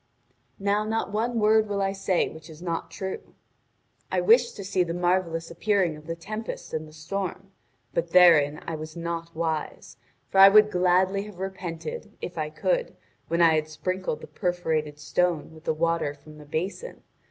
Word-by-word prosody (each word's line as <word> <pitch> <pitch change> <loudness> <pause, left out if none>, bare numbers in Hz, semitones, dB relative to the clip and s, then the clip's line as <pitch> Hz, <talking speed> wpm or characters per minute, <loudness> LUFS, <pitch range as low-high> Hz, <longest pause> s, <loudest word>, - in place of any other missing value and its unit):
Now 200 +1 +1
not 220 -1 -2
one 230 +3 0
word 215 0 +4
will 200 -1 -1
I 195 0 +1
say 195 -2 0
which 160 0 -11
is 155 -1 -12
not 170 -2 -3
true. 190 -1 -6 0.8
I 185 - +2
wished 230 +6 +4
to 200 - -7
see 190 -1 0
the 170 -1 -4
marvellous 175 -2 0
appearing 185 -2 +1
of 150 0 -14
the 165 - -3
tempest 215 +6 -6
and 155 0 -3
the - - -14
storm; 190 +4 -5 0.4
but 170 0 -1
therein 160 -5 +6
I 165 - -4
was 155 +1 -8
not 170 0 -4
wise, 160 -1 -3 0.3
for 195 - +3
I 195 0 +11
would 210 +1 +6
gladly 185 +2 +2
have 210 -4 -11
repented, 185 +1 -6
if 180 - -6
I 155 -2 -2
could, - - -1 0.3
when 170 +1 +2
I 165 -1 +6
had 155 -1 +1
sprinkled 185 +1 -3
the - - -9
perforated 160 -5 -2
stone 160 +1 0
with 160 0 -15
the - - +2
water 165 -2 0
from 150 +1 -15
the 150 - -12
basin. 185 - -4
175 Hz, 180 wpm, -26 LUFS, 160-195 Hz, 0.8 s, I